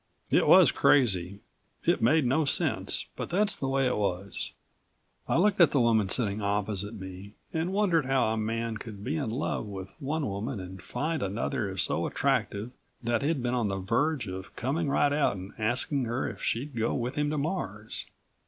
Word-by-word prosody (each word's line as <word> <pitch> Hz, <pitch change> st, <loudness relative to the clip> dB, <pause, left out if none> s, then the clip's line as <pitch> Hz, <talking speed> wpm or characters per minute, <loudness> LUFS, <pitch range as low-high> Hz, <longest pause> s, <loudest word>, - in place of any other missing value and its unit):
It -, -, +4 dB
was -, -, +8 dB
crazy, 100 Hz, -8 st, +3 dB, 0.4 s
it -, -, +2 dB
made 145 Hz, +5 st, +4 dB
no 135 Hz, +6 st, +2 dB
sense, 140 Hz, -, +1 dB
but -, -, -5 dB
that's 200 Hz, +3 st, +2 dB
the 135 Hz, -, -3 dB
way 135 Hz, 0 st, +2 dB
it 125 Hz, -, +1 dB
was. 100 Hz, -1 st, -2 dB, 0.7 s
I -, -, +2 dB
looked 200 Hz, +2 st, +3 dB
at 170 Hz, -, +8 dB
the 140 Hz, -, +2 dB
woman 110 Hz, -5 st, +3 dB
sitting 105 Hz, -2 st, +1 dB
opposite 105 Hz, +1 st, -1 dB
me 95 Hz, +2 st, -9 dB, 0.2 s
and 165 Hz, +3 st, -1 dB
wondered 180 Hz, -8 st, +2 dB
how 135 Hz, -4 st, +2 dB
a 110 Hz, -, 0 dB
man 115 Hz, +1 st, -2 dB
could 105 Hz, -2 st, -9 dB
be 150 Hz, -, -2 dB
in 140 Hz, -7 st, -1 dB
love 120 Hz, -2 st, -2 dB
with 95 Hz, -2 st, -7 dB
one 145 Hz, +2 st, -2 dB
woman 105 Hz, +3 st, -3 dB
and 95 Hz, 0 st, -8 dB
find 160 Hz, +2 st, -2 dB
another 100 Hz, 0 st, -2 dB
so -, -, 0 dB
attractive 125 Hz, -4 st, 0 dB, 0.3 s
that 120 Hz, +2 st, +1 dB
he'd 145 Hz, -2 st, 0 dB
been 125 Hz, 0 st, 0 dB
on 120 Hz, -4 st, +1 dB
the 95 Hz, -1 st, -2 dB
verge 120 Hz, +8 st, 0 dB
of 95 Hz, 0 st, -7 dB
coming 140 Hz, +5 st, -1 dB
right 140 Hz, +1 st, +3 dB
out 145 Hz, -7 st, +2 dB
and 95 Hz, +1 st, -8 dB
asking 125 Hz, +4 st, 0 dB
her 120 Hz, +3 st, -1 dB
if -, -, -7 dB
she'd 135 Hz, +4 st, -2 dB
go 115 Hz, 0 st, 0 dB
with 125 Hz, +1 st, -2 dB
him 150 Hz, 0 st, 0 dB
to 155 Hz, -, -1 dB
Mars. 115 Hz, -, -4 dB
120 Hz, 190 wpm, -28 LUFS, 100-145 Hz, 0.7 s, was